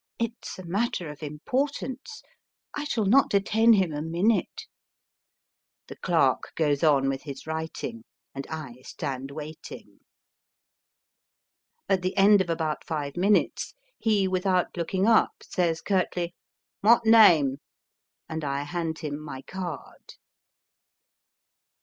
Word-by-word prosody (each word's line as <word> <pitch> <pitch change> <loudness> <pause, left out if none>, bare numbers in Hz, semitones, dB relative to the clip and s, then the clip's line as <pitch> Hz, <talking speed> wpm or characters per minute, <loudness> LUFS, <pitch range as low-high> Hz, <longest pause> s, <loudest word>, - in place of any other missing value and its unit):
It 230 0 -1
s - - -7
a 185 - -8
matter 180 -3 -2
of 150 - -13
importance. 260 - -3 0.5
I 295 - -4
shall 225 -7 -1
not 260 +8 +5
detain 220 +3 +4
him 185 -6 +2
a 145 - -3
minute." 175 +8 0 1.3
The - - -8
clerk - - +1
goes 145 -3 +1
on 140 -4 +4
with 135 0 -2
his 140 -3 -8
writing, 160 +9 -5 0.3
and 135 0 -6
I 135 -6 -7
stand 135 0 -5
waiting. 155 +2 -9 1.9
At 190 -1 +2
the 185 +2 -3
end 200 0 +6
of 180 - -3
about 160 -2 -2
five 145 -3 -4
minutes, 200 - +1 0.2
he, 210 -4 +2
without 185 -1 0
looking 185 +3 -1
up, 225 0 +4
says 170 -3 -1
curtly, 180 -3 -1 0.2
" - - -66
What 230 +2 +5
name? 170 -12 +6 0.4
" - - -65
and 160 -1 -5
I 140 0 -2
hand 160 +1 -3
him 150 -3 -5
my 140 -3 -8
card. 175 -6 -8
175 Hz, 130 wpm, -26 LUFS, 150-205 Hz, 1.9 s, end